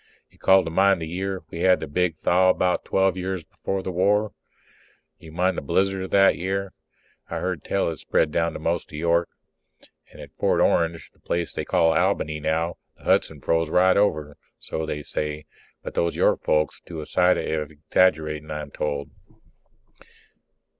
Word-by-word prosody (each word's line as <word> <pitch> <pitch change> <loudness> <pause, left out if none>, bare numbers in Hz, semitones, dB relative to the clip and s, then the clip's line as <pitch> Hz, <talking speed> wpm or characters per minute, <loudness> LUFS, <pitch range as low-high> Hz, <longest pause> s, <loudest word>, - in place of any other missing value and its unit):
You - - -26
call 95 0 +5
to 80 - -5
mind 95 +1 +3
the 80 - -5
year 95 +3 -4
we 85 - -6
had 90 +1 +4
the - - -4
big 85 +3 0
thaw, 90 +4 +3
about 90 -1 +1
twelve 95 -1 +2
years 95 -1 -3
before 95 +4 -4
the 95 - -3
war? 100 +4 +2 0.9
You 80 -2 -13
mind 90 +2 0
the - - -10
blizzard 95 +5 0
that 95 -1 +5
year? 95 +1 -2 0.6
I - - -3
heard 90 -5 -3
tell 100 - 0
it 80 - -7
spread 75 +3 0
down 85 0 -1
most 85 +2 -2
to 75 - -8
York. 85 +1 +1 0.8
And - - -15
at - - -12
Fort - - +2
Orange, 85 0 +1
the - - -31
place 85 0 -2
they - - -4
call 85 -3 +3
Albany 75 -1 0
now, 80 +2 -1 0.2
the - - -21
Hudson - - +1
froze 80 -1 +1
right 90 +2 +4
over, 75 -8 0 0.2
so 80 0 -5
they 75 -1 -4
say. 75 +1 -4 0.4
But - - -6
those 85 0 0
York - - +2
folks 75 0 0
do 85 -2 -7
a 75 - -6
sight 90 +3 +3
of 75 -2 -2
exaggerating, 75 0 0
I'm 75 -2 -5
told. 70 -1 -3
85 Hz, 175 wpm, -24 LUFS, 80-95 Hz, 0.9 s, call